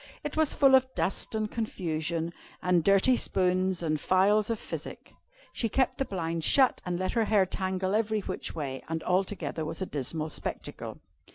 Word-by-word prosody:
It 295 - -4
was 315 -1 +2
full 275 -2 +5
of 260 0 +5
dust 195 - -1
and 215 -1 -1
confusion, 170 -6 -2 0.3
and 180 -2 +2
dirty 200 +7 +5
spoons 185 -4 +1
and 155 -2 -1
phials 205 +3 +3
of 230 - 0
physic. - - -7 0.4
She 230 - -1
kept 260 +4 +1
the 270 - +1
blinds 165 -5 -3
shut, 260 - +4
and 175 -1 -1
let 185 +1 -1
her 230 -2 +1
hair 205 -3 +3
tangle 185 +1 -2
every 215 0 +1
which - - -5
way, 135 -4 -4
and 160 0 -3
altogether 185 -3 -1
was 160 +1 -5
a 190 - -2
dismal 155 +1 -2
spectacle. - - -5
185 Hz, 175 wpm, -29 LUFS, 165-220 Hz, 0.4 s, full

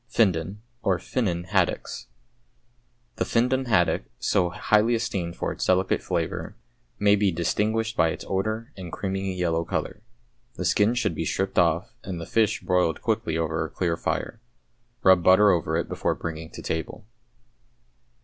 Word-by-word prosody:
=Findon, 100 -3 +1 0.2
or 95 -4 +2
"Finnan," 90 -2 -2
Haddocks.= 95 -1 -1 1.1
The - - +1
Findon 130 +3 +1
haddock, 105 -8 +2 0.2
so 90 - +1
highly 105 +4 +2
esteemed 90 -6 -2
for - - -2
its - - -4
delicate 95 +1 +2
flavour, 85 -1 -3 0.4
may 105 0 +4
be 100 -1 +2
distinguished 110 +7 0
by 80 -6 +3
its - - -5
odour 110 +7 -2
and 90 -3 -8
creamy 95 -1 -3
yellow 85 -2 0
colour. - - -3 0.5
The - - -4
skin 105 +4 +3
should 120 -8 0
be 80 - -3
stripped 95 +4 0
off, 85 +2 +1
and 90 -2 -5
the 85 - -6
fish 110 +3 +1
broiled 90 -3 +1
quickly 80 - 0
over 80 -1 -1
a 80 - -5
clear 85 -3 -1
fire. 115 +6 -3 0.6
Rub 95 -2 +6
butter 100 +3 +6
over 80 -2 0
it 85 - -1
before - - -1
bringing 80 -1 -6
to - - -10
table. 80 +6 -4
95 Hz, 155 wpm, -25 LUFS, 85-105 Hz, 1.1 s, Rub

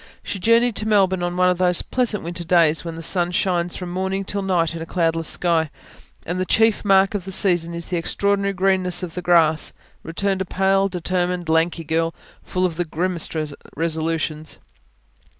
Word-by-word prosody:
She 200 - -5
journeyed 230 +3 +3
to 215 - -2
Melbourne 190 -4 +3
on 175 0 -2
one 180 0 +4
of 180 - -3
those 180 -1 +1
pleasant 240 -5 -1
winter 170 +1 -5
days 165 -2 +3
when 165 -1 -6
the 165 - -7
sun 175 +1 +1
shines 175 -1 0
from 180 -2 -6
morning 190 +2 -2
till 200 +1 -1
night 175 -4 0
in 165 - -6
a - - -4
cloudless 165 -2 0
sky, 165 -3 +1 0.6
and 175 +2 -3
the - - +1
chief 225 -1 +3
mark 195 -1 +4
of 205 -3 -3
the 190 - -7
season 175 -3 +2
is 170 0 -5
the 180 - -2
extraordinary 200 +3 0
greenness 185 -1 +1
of 170 -2 -5
the 180 - -4
grass; 165 -3 +3 0.3
returned 190 +3 -1
a - - -1
pale, 195 +1 +2
determined, 180 -1 -2
lanky 165 +1 +1
girl, 165 +1 -1 0.3
full 185 0 -1
of 170 -3 -2
the 175 - -1
grimmest 170 +1 -1 0.4
resolutions. 160 -1 -2
180 Hz, 185 wpm, -21 LUFS, 165-190 Hz, 0.6 s, one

